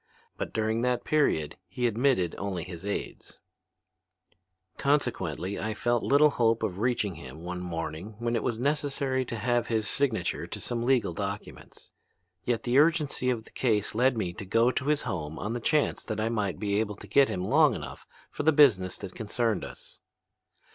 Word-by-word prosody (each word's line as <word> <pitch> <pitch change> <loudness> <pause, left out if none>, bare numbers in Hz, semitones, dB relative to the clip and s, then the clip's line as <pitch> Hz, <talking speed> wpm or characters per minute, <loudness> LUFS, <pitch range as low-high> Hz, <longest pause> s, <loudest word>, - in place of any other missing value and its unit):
But - - -4
during 110 +1 0
that 125 0 0
period 85 - +1
he 120 +7 -2
admitted 120 -6 +2
only 95 -4 -3
his 90 +1 -8
aids. 100 - -5 1.4
"Consequently 100 - 0
I 110 0 -2
felt 120 +1 +1
little 145 +2 +5
hope 115 -3 +2
of 100 -4 -2
reaching 115 -4 0
him 75 0 -10
one 90 +1 -4
morning 85 +3 -5
when 120 +1 -1
it 115 - +1
was 115 - -1
necessary 135 -1 0
to 120 - -5
have 120 +1 0
his 110 -2 0
signature 135 -3 -1
to - - -6
some 120 -1 -3
legal 125 -9 +2
documents. 100 +3 -7 0.5
Yet 120 -2 -1
the 125 +3 +3
urgency 150 -4 +2
of 115 -3 -1
the - - -15
case 110 -5 0
led 125 +2 +3
me 90 -5 -2
to 95 - -7
go 115 +6 +3
to 135 - -2
his 150 0 +1
home 80 -3 -4
on 105 +3 -3
the 120 - -2
chance 150 +5 +1
that 110 - -3
I 110 +1 0
might 100 -8 -1
be 100 -1 0
able 105 -2 -1
to - - -11
get 140 -1 +4
him 90 0 -2
long 145 +2 +4
enough - - -8 0.2
for - - -4
the 155 +2 +4
business 120 -12 +4
that 95 -2 -8
concerned 115 +1 -1
us. - - -9
115 Hz, 180 wpm, -28 LUFS, 95-125 Hz, 1.4 s, little